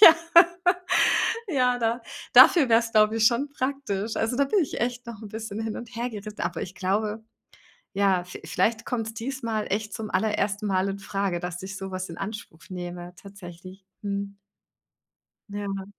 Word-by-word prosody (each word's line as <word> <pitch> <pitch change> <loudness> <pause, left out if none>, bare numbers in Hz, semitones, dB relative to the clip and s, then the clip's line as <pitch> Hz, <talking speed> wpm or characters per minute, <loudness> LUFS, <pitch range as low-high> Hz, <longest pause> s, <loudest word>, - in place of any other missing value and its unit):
Ja. 330 -6 +11 1.3
Ja, 250 -5 +2
da 230 +1 0 0.3
dafür 310 -8 +8
wäre 230 0 +6
es, 230 -1 -6
glaub 215 0 +5
ich, 225 -1 +3
schon 250 +5 +2
praktisch. 260 -7 -3
Also, 225 +2 0
da 280 - +3
bin 280 +10 +1
ich 300 - -2
echt 245 0 -2
noch 230 -2 -8
'n 215 - -8
bisschen 220 0 -6
hin 220 -1 -3
und 235 - -7
hergeri 225 -3 -4
aber 170 -1 -2
ich 185 - -7
glaube, 210 +4 -1 0.7
ja, 195 -2 +2
vie 180 - -10
vielleicht 225 0 0
kommt's 225 -2 -3
diesmal 230 -2 -3
echt 210 +1 -2
zum 220 -2 -5
allerersten 210 -1 0
Mal 190 0 +1
infrage, 195 -2 -2
dass 180 +1 -5
ich 195 +1 -6
so 190 0 -6
was 185 0 -4
in 165 - -8
Anspruch 195 -5 -7
nehme 175 -1 -6
tatsächlich. 190 -1 -12 0.2
Mhm. 200 0 -4 1.1
Ja. 200 -1 -4
210 Hz, 165 wpm, -26 LUFS, 195-230 Hz, 1.3 s, Ja